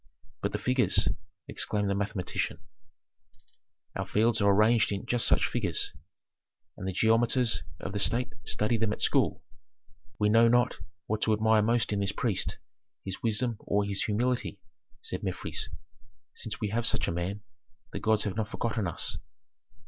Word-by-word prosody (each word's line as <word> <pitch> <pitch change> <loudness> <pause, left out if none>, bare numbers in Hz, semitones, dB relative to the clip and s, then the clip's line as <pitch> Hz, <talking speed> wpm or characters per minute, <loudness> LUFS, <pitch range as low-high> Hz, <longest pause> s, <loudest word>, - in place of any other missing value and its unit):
"But 100 - -1
the - - -1
figures?" 125 +4 +2 0.4
exclaimed 105 -1 -1
the 100 - +1
mathematician. 100 -2 -2 1.3
"Our - - -3
fields 110 +1 +2
are 100 - +5
arranged 110 +3 +4
in 100 -1 -3
just 120 -1 +1
such - - +4
figures, - - 0 0.8
and 95 - -6
the - - 0
geometers 115 +4 +2 0.2
of 95 - -5
the 100 - -1
state 115 +1 0
study 110 +2 0
them 110 -1 +1
at - - -5
school." - - +2 0.7
"We 105 - +2
know 115 +2 +6
not 120 0 +3 0.3
what 110 0 -2
to 110 - +3
admire 110 0 +4
most 115 0 +1
in 100 - 0
this 100 0 0
priest, 110 -7 -1 0.5
his 95 -1 -5
wisdom 115 +1 0
or 100 0 0
his 100 -1 +1
humility," 120 +4 0 0.5
said - - -2
Mefres. - - -3 0.6
"Since 105 -2 -5
we 105 - -1
have 115 +3 0
such - - 0
a - - 0
man, 90 +4 -3 0.5
the - - -3
gods 110 -1 +2
have 100 -4 -2
not 110 -1 -1
forgotten 115 -4 -1
us." 85 - 0
110 Hz, 160 wpm, -29 LUFS, 100-115 Hz, 1.3 s, know